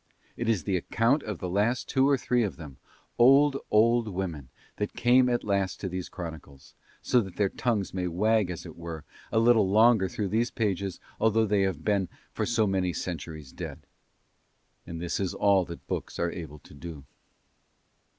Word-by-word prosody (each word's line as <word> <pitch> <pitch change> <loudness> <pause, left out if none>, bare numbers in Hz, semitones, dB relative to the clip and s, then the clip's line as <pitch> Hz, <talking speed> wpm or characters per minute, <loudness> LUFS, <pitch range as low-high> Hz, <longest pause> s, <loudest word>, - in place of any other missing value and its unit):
It 120 -1 -2
is 110 -6 +1
the 95 -3 0
account 115 - +1
of 105 -7 -5
the 90 - -4
last 105 +7 0
two 135 +1 +3
or 140 - +4
three 125 -1 +1
of 105 -4 -1
them, 70 -6 -10 0.4
old, 135 +3 +6
old 115 +2 +4
women, 90 - -4 0.3
that 105 - -3
came 125 +1 +4
at 120 -1 0
last 100 -3 -1
to 95 - -3
these 90 -1 -5
chronicles, 80 -5 -9 0.3
so 125 - +3
that 95 -4 -8
their 100 -2 +1
tongues 110 -5 -1
may 90 -1 -1
wag 105 +3 +2
as 90 -1 -6
it 80 - -9
were 85 -2 -7 0.3
a - - 0
little 115 -3 +4
longer 110 -1 +5
through 100 0 -3
these 115 +4 +1
pages 100 -5 -2 0.2
although 110 0 +3
they 105 -1 +2
have 95 -5 -1
been 100 -1 +1 0.2
for - - -2
so 115 -2 +2
many 95 -3 0
centuries 80 -5 -6
dead. - - -8 1.0
And 85 - -6
this 85 0 -2
is 95 -2 -2
all 100 -3 +3
that 85 -1 -10
books - - -4
are 85 0 0
able 80 -4 -8
to 75 - -17
do. 75 -1 -9
100 Hz, 185 wpm, -28 LUFS, 85-115 Hz, 1.0 s, old